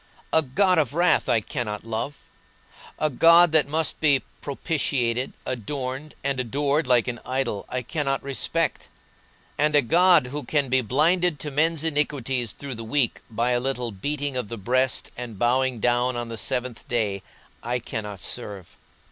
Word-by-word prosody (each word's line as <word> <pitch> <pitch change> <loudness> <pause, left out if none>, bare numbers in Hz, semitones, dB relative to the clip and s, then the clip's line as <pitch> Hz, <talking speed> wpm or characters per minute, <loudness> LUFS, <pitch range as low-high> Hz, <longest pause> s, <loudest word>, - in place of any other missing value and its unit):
A 160 - +5
God 180 +6 +2
of 145 -2 0
wrath 175 +1 +3
I 115 -2 +3
cannot 105 -1 -4
love; 115 +6 -3 0.8
a 155 - +1
God 170 +4 +6
that 155 -2 +4
must 155 +1 -1
be 145 -4 +3 0.2
propitiated, 130 -4 -1
adorned, 130 +4 -4
and 140 -1 -1
adored 140 +5 0
like 125 -2 +4
an 120 -1 -3
idol 130 -5 -2
I 125 0 -2
cannot 135 0 -1
respect; 135 -4 -2 0.7
and 150 +1 +3
a 145 - +5
God 175 +3 +5
who 150 - -3
can 145 -4 0
be 130 +1 +3
blinded 155 - +2
to 150 - -4
men's 155 +2 +1
iniquities 135 -6 0
through 140 -2 -7
the 115 -1 -7
week 125 +1 0
by 115 +2 0
a 120 - +2
little 125 -2 -2
beating 145 +7 -3
of 125 -5 -3
the 115 - -5
breast 130 +5 0
and 120 -4 -7
bowing 125 +2 +1
down 120 +2 +2
on 120 -1 -4
the 115 - -5
seventh 125 0 -2
day, 105 -5 0 0.4
I 120 +1 -1
cannot 105 -5 -5
serve. 100 -7 -6
130 Hz, 165 wpm, -24 LUFS, 120-150 Hz, 0.8 s, God